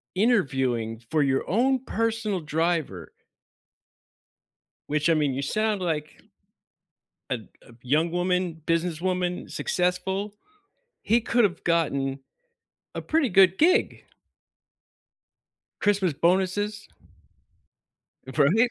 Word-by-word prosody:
interviewing 135 - +1
for 155 - +2
your 135 -1 0
own 255 +6 +2
personal 225 -4 -1
driver. 155 - -2 1.8
Which 150 +2 0
I 165 - +5
mean, 145 -4 +1
you 135 - -3
sound 215 +7 0
like 155 -3 -3 1.1
a - - +1 0.3
a - - -17
young 155 +6 +1
woman, 180 -1 -1
businesswoman, 180 +2 -1
successful, 190 +3 -1 0.7
he 235 +2 +3
could 235 +1 +2
have 190 -4 0
gotten 140 -5 0 0.8
a - - -4
pretty 315 -4 +1
good 190 -2 +5
gig. 365 +7 +2 1.8
Christmas 200 -4 +2
bonuses. 190 +6 0 1.4
Right? 155 - +3
180 Hz, 95 wpm, -25 LUFS, 150-205 Hz, 1.8 s, I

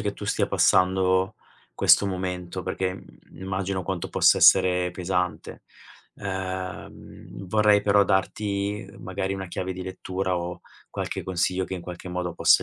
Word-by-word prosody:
che 100 0 -2
tu 105 - -8
stia - - +1
passando 95 +2 +3 0.4
questo 100 - +5
momento, 90 -1 -4
perché, 95 0 -2
mhmm, - - -16
immagino 95 0 -2
quanto 90 -1 -3
possa - - +4
essere 90 -1 +5
pesante. 90 -3 -3 0.6
Ehm, 95 -1 -6
vorrei 105 +1 +4
però 100 0 +4
darti 100 +1 -1
magari 95 +1 -3
una 95 -2 -6
chiave 95 +1 -4
di 95 - -6
lettura 95 0 -3
o 85 0 -6 0.3
qualche - - -4
consiglio 95 +1 0
che 95 - -5
in 90 - -6
qualche 90 +1 -8
modo 90 0 -3
possa - - +4
95 Hz, 145 wpm, -25 LUFS, 90-95 Hz, 0.6 s, questo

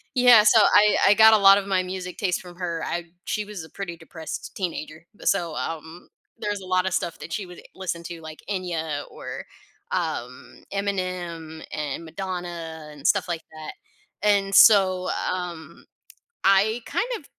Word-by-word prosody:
yeah, 245 -4 +7
so 220 +1 +6
I 210 +1 +5
I 200 - +7
got 220 0 +8
a 220 - +7
lot 195 0 +7
of 200 - -3
my 190 -2 +1
music 180 -1 -6
taste 185 -4 0
from 175 -1 -12
her, 170 -2 -3
I 170 0 -3 0.2
she 210 - -1
was 205 -5 -7
a - - -16
pretty 175 -4 -6
depressed 160 -1 -8
teenager, 165 -3 -5
b - - -13
so, 175 -5 +1
um, 165 +1 -6 0.3
there's 205 -1 -3
a 185 - -9
lot 185 0 +1
of 190 - -2
stuff 170 - -3
that - - -9
she 205 - -3
would 180 -1 -12
listen 175 -3 -4
to, 170 0 -7
like 160 -1 -10
Enya 165 -6 -3
or, - - -7 0.5
um, - - -4
Eminem 180 -5 -3
and 150 +1 -4
Madonna 170 -2 -6
and 150 +1 -4
stuff 200 -3 +2
like 170 -2 -3
that. 155 -1 -8 0.5
And 200 -1 +2
so, 190 -4 +6 0.2
um, 170 -3 -6 0.6
I 205 +4 +4
kind 480 - -1
of 310 - -16
180 Hz, 175 wpm, -24 LUFS, 165-195 Hz, 0.6 s, got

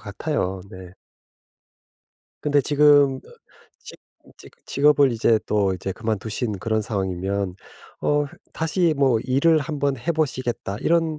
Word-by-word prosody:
같아요. 100 - -3
네. 95 -2 -11 1.5
근데 145 -1 +2
지금 145 -2 +4
어 - - -17 0.5
직 - - -10 0.3
인제 - - -16
그 - - -30
직업을 145 -1 +4
이제 115 0 +2
또 100 -3 +1
이제 95 +1 -5
그만두신 110 0 -3
그런 110 +3 -1
상황이면 95 -2 -2 0.5
어 145 0 +2 0.3
다시 165 0 0
뭐 135 -5 +3
일을 140 +5 +3
1 150 +1 -4
번 140 -1 +1
해 140 +9 -3
보시겠다 130 -9 -2
이런 165 -2 +1
130 Hz, 240 characters per minute, -23 LUFS, 100-150 Hz, 1.5 s, 지금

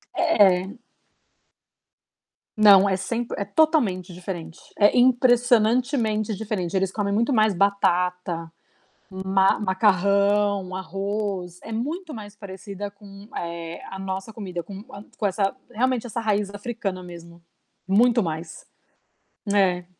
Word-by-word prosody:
É. 200 - +3 1.8
Não, 200 -2 +7
é 190 - +1
sempre 230 +5 -3
é 200 - -2
totalmente 205 - +1
diferente, 175 -2 -7 0.2
é 205 +3 +4
impressionantemente 245 -2 +3
diferente. 195 -4 -3
Eles 190 0 +1
comem 200 0 -2
muito 235 +6 +1
mais 215 -3 +3
batata, 180 -3 0 0.6
ma-macarrão, 195 0 +2
arroz. 195 -1 -4
É - - -8
muito 305 +9 -4
mais 205 -2 -9
parecida 200 0 -8
com, 200 0 -14
eh, 170 0 -6
a 195 - -7
nossa 190 +2 -5
comida, 185 -5 -5
com 200 +2 -9 0.3
com 215 - -2
essa 195 +2 0 0.2
realmente 250 +1 0
essa 235 - -4
raiz 210 -3 0
africana 205 -3 -4
mesmo, 170 -1 -12 0.5
muito 235 +5 +4
mais 160 -1 -6 0.9
é. 180 -3 +2
200 Hz, 110 wpm, -24 LUFS, 185-220 Hz, 1.8 s, Não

